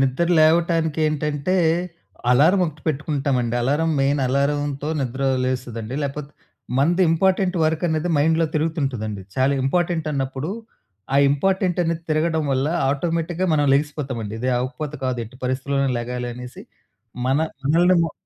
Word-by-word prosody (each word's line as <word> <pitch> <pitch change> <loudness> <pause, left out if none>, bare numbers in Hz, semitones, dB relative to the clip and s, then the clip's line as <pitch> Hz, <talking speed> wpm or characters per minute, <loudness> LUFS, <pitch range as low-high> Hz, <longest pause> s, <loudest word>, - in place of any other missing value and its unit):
నిద్ర 135 +5 +1
లేవటానికి 160 0 +3
ఏంటంటే, 150 +3 -1 0.7
అలారం 155 +10 +5
ఒకటి 155 -2 -9
పెట్టుకుంటామండి. 140 -5 -1
అలారం 150 +6 +1
మెయిన్ 140 +1 +2
అలారంతో 140 +2 0
నిద్ర 130 +1 -3 0.2
లేస్తదండి. 125 -2 -3
లేకపోతే 140 +1 -4 0.5
మనది 170 +7 +3
ఇంపార్టెంట్ 185 +2 +2
వర్క్ 155 +1 0
అనేది 160 +2 -1
మైండ్‌లో 160 +3 +3
తిరుగుతుంటదండి, 135 - -2
చాలా 130 +1 +3
ఇంపార్టెంట్ 170 +2 0
అన్నప్పుడు 135 +3 -3 0.6
ఆ - - +5
ఇంపార్టెంట్ 185 +5 +1
అనేది 165 -1 -2
తిరగడం 160 +1 +1
వల్ల 135 +2 +1 0.2
ఆటోమేటిక్‌గా 165 +4 -1
మనం 145 -2 +2
లెగిసిపోతామండి. 140 -7 -2
"ఇది 125 - -1
అవ్వకపోతే 145 +4 -4
కాదు 130 -1 -1
ఎట్టి 115 +3 -14
పరిస్థితిలోనే 135 +2 0
లెగాలి" 125 +1 -4
అనేసి, 125 +1 -9 0.6
మన 135 +1 +2 0.3
మనల్నిమా 170 +3 +3
145 Hz, 125 wpm, -22 LUFS, 130-165 Hz, 0.7 s, అలారం